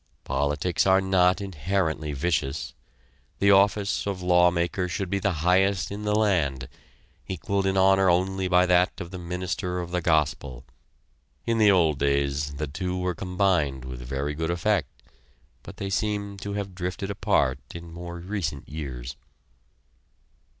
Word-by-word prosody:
Politics 75 +7 0
are 95 0 +5
not 95 -1 +3
inherently 80 -3 -2
vicious. 70 -1 -1 0.6
The 100 0 +4
office 100 +1 +3
of 95 -2 -3
lawmaker 90 0 +2
should 95 +1 -3
be 100 - +1
the 100 +1 +1
highest 95 -1 +3
in 105 +1 -5
the 105 0 +1
land, 80 - +1 0.6
equaled 95 +2 -1
in 95 0 +1
honor 95 0 +5
only 95 +2 +1
by 90 0 +4
that 90 0 +2
of 85 - -7
the 95 - -6
minister 90 +1 -3
of 85 -1 -5
the 90 0 0
gospel. 75 -6 0 0.8
In 115 -1 +1
the 105 -1 +6
old 80 -7 +3
days, 70 +1 0
the 75 +2 -2
two 90 +6 -3
were 90 0 -1
combined 90 -7 0
with 65 -1 -7
very 70 +4 -3
good 80 +2 -3
effect; 85 -1 +1 0.7
but - - -11
they 95 0 -4
seem 100 0 -1
to 100 +1 -5
have 100 -2 -4
drifted 90 +2 -4
apart 65 -8 +1 0.2
in 85 -1 -9
more 85 0 -7
recent 85 -6 -4
years. 65 -4 -6
90 Hz, 150 wpm, -26 LUFS, 75-95 Hz, 0.8 s, the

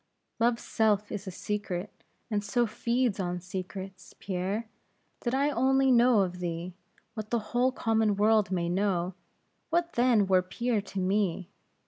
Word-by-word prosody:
Love's 235 0 +2
self 210 -2 +1
is 205 -1 -5
a - - -1
secret, 200 0 -4 0.4
and 205 -1 0
so 240 +4 +1
feeds 235 0 0
on 180 -1 -2
secrets, 190 +1 -7
Pierre. 195 +4 -3 0.5
Did 240 +1 -1
I 285 +2 +2
only 265 +1 +3
know 240 -3 +5
of 180 -1 -2
thee, 175 0 -4 0.4
what 215 -1 -6
the 240 - +1 0.2
whole 250 +2 +3
common 220 -4 +1
world 210 -1 +3
may 175 -2 -1
know 185 -1 0 0.6
what 340 +1 0
then 235 -4 +4
were 190 -1 +4
Pierre 225 +4 -1
to 195 0 -6
me? 190 -1 0
205 Hz, 150 wpm, -29 LUFS, 185-235 Hz, 0.6 s, know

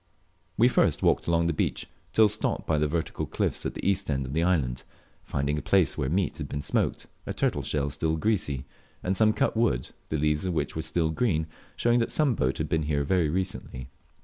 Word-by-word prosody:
We 120 - +6
first 125 - +2
walked - - +2
along 85 0 +2
the 85 - +1
beach, - - -1 0.3
till 110 -1 +6
stopped 105 +1 -1
by 75 -2 +1
the 75 - +2
vertical 80 +2 -2
cliffs - - -1
at - - -6
the - - -3
east 100 -5 +1
end 70 -2 0
of 65 - -6
the 80 - +1
island, 75 -9 +1 0.4
finding 70 +2 -1
a - - -6
place 95 -6 +3
where 65 - -1
meat 90 +1 0
had - - -5
been 70 - -4
smoked, - - -1 0.2
a - - -2
turtle - - 0
shell 70 -1 -1
still 80 +1 -1
greasy, 80 - 0 0.4
and 95 +1 0
some 110 +2 +4
cut 135 +3 0
wood, 110 - +1 0.2
the 80 - 0
leaves 75 0 +1
of 90 -2 -1
which - - -1
were 80 - -1
still 80 0 0
green, 80 -4 +1 0.3
showing 120 0 +3
that 115 - 0
some 150 -5 +2
boat 65 - 0
had - - -2
been 80 - +1
here 70 -1 +1
very 85 +1 +2
recently. 75 -7 -4
80 Hz, 220 wpm, -27 LUFS, 70-95 Hz, 0.4 s, We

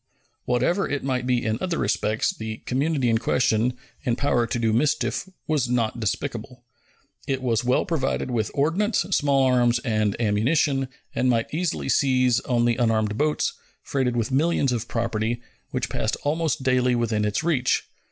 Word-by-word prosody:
Whatever 130 +11 +1
it 145 - -2
might 130 -2 -1
be 125 -2 +1
in 110 +1 0
other 180 -3 -1
respects, 110 +1 0
the 110 0 -5
community 135 0 0
in 115 -1 +2
question, 125 0 +1 0.3
in 120 -5 +1
power 120 -3 +1
to - - -2
do 115 -2 +1
mischief, 145 +8 0 0.2
was 145 -6 0
not 120 -2 0
despicable. 120 +2 -4 0.6
It 135 -1 0
was 115 -2 +1
well 125 +1 +2
provided 135 -6 -1
with 110 -3 0
ordnance, 170 +10 +1
small 140 -5 +3
arms, 125 -2 +3
and 110 -3 0
ammunition, 130 +6 +1 0.3
and 130 - +1
might 115 +1 0
easily 170 +1 -1
seize 130 -3 +3
on 120 -2 0
the 120 -1 +2
unarmed 110 -3 +1
boats, 150 +5 0 0.3
freighted 125 -3 -1
with 115 +2 -1
millions 145 -1 +2
of 120 -3 -2
property, 115 0 -1 0.3
which 130 0 -2
passed 110 - -2
almost 155 -2 0
daily 125 -1 +2
within 115 -3 0
its 105 +6 -1
reach. 150 -7 +1
125 Hz, 160 wpm, -24 LUFS, 115-140 Hz, 0.6 s, small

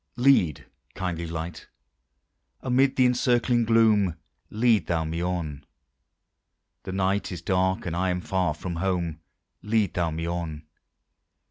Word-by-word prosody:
Lead, 120 - +3 0.3
kindly 85 -2 -3
Light, 80 0 -6 0.9
amid 130 +1 +2
the 130 - +4
encircling 120 -1 +2
gloom, 110 -6 +4 0.3
Lead 110 -5 +2
thou 85 -2 0
me 80 +2 -3
on! 85 -5 -3 1.2
The - - -7
night 95 +2 0
is 85 -2 -6
dark, 95 0 +1
and 85 -2 -3
I 95 +1 0
am 90 0 0
far 90 -4 0
from 85 +2 -5
home, 85 -3 -1 0.4
Lead 105 -3 +1
thou 85 -2 0
me 80 +1 -4
on! 80 -3 -4
90 Hz, 130 wpm, -26 LUFS, 85-110 Hz, 1.2 s, the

